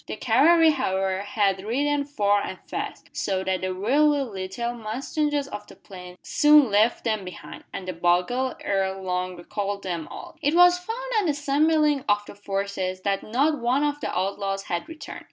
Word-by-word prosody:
The -, -, -4 dB
cavalry, 315 Hz, +9 st, +5 dB
however, 190 Hz, -8 st, -1 dB
had 200 Hz, -2 st, 0 dB
ridden 285 Hz, +6 st, 0 dB
far 205 Hz, -8 st, +1 dB
and -, -, -5 dB
fast, -, -, -6 dB
so 190 Hz, -1 st, -1 dB
that 190 Hz, -1 st, -1 dB
the 185 Hz, 0 st, -2 dB
wiry 285 Hz, +9 st, +3 dB
little 210 Hz, +1 st, -4 dB
mustangs 275 Hz, +6 st, -2 dB
of 210 Hz, -4 st, -7 dB
the -, -, -14 dB
plains 180 Hz, -2 st, -12 dB
soon 295 Hz, -5 st, +5 dB
left 215 Hz, +4 st, +3 dB
them 215 Hz, -3 st, -1 dB
behind, 180 Hz, -1 st, -10 dB
and 185 Hz, -, -7 dB
the 185 Hz, -, -3 dB
bugle 180 Hz, +10 st, +1 dB
ere 195 Hz, -1 st, -1 dB
long 180 Hz, -1 st, -3 dB
recalled 200 Hz, +3 st, -4 dB
them 170 Hz, -4 st, -4 dB
all. -, -, -10 dB
It 300 Hz, +2 st, +1 dB
was 355 Hz, 0 st, +6 dB
found 445 Hz, +6 st, -5 dB, 0.2 s
on 410 Hz, -, 0 dB
the 310 Hz, -, +2 dB
assembling 295 Hz, 0 st, +2 dB
of 205 Hz, 0 st, +2 dB
the -, -, -10 dB
forces 195 Hz, -2 st, -3 dB
that 195 Hz, 0 st, 0 dB
not 285 Hz, +7 st, +1 dB
one 250 Hz, +4 st, +1 dB
of 290 Hz, 0 st, -1 dB
the -, -, -3 dB
outlaws 195 Hz, +1 st, -2 dB
had 175 Hz, -, -4 dB
returned. 320 Hz, -1 st, -8 dB
210 Hz, 180 wpm, -25 LUFS, 190-285 Hz, 0.2 s, was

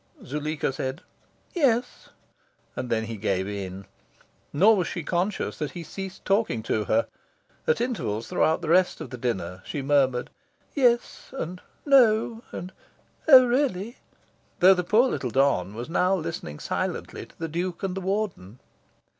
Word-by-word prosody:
Zuleika 150 Hz, 0 st, -2 dB
said 130 Hz, +1 st, -4 dB, 0.5 s
"Yes;" 250 Hz, -7 st, 0 dB, 0.7 s
and 125 Hz, -1 st, -4 dB
then 110 Hz, -1 st, +1 dB
he 115 Hz, 0 st, -5 dB
gave 95 Hz, -2 st, -1 dB
in. 100 Hz, -1 st, -6 dB, 0.7 s
Nor 200 Hz, +10 st, +5 dB
was 180 Hz, -, 0 dB
she 170 Hz, -, -4 dB
conscious 185 Hz, +6 st, -1 dB
that 150 Hz, -, -3 dB
he 175 Hz, -, -6 dB
ceased 190 Hz, +3 st, -8 dB
talking 195 Hz, -, +1 dB
to 110 Hz, -1 st, -1 dB
her. 115 Hz, +2 st, +2 dB, 0.6 s
At 155 Hz, -, +3 dB
intervals 165 Hz, -, -2 dB
throughout 160 Hz, +2 st, +1 dB
the 160 Hz, -, -3 dB
rest 180 Hz, +2 st, +3 dB
of 125 Hz, -, -7 dB
dinner, 95 Hz, -7 st, -2 dB
she 145 Hz, -, -4 dB
murmured 135 Hz, -3 st, +2 dB, 0.4 s
"Yes," 245 Hz, -4 st, +1 dB
and 180 Hz, -4 st, -5 dB, 0.2 s
"No," 230 Hz, -5 st, +4 dB
and 180 Hz, +2 st, -6 dB, 0.6 s
"Oh 260 Hz, -4 st, +10 dB
really?" 240 Hz, -4 st, 0 dB, 0.6 s
though 185 Hz, +2 st, +8 dB
the 180 Hz, -1 st, -1 dB
poor 220 Hz, +8 st, +4 dB
little 130 Hz, -, -2 dB
don 110 Hz, -7 st, +1 dB
was 120 Hz, +2 st, -5 dB
now 180 Hz, +3 st, +2 dB
listening 160 Hz, -, -5 dB
silently -, -, -4 dB
to -, -, -23 dB
the 165 Hz, -, -3 dB
Duke 175 Hz, +3 st, -3 dB
and 190 Hz, -1 st, -2 dB
the 195 Hz, -, -3 dB
Warden. 190 Hz, -, -3 dB
165 Hz, 150 wpm, -26 LUFS, 125-205 Hz, 0.7 s, Oh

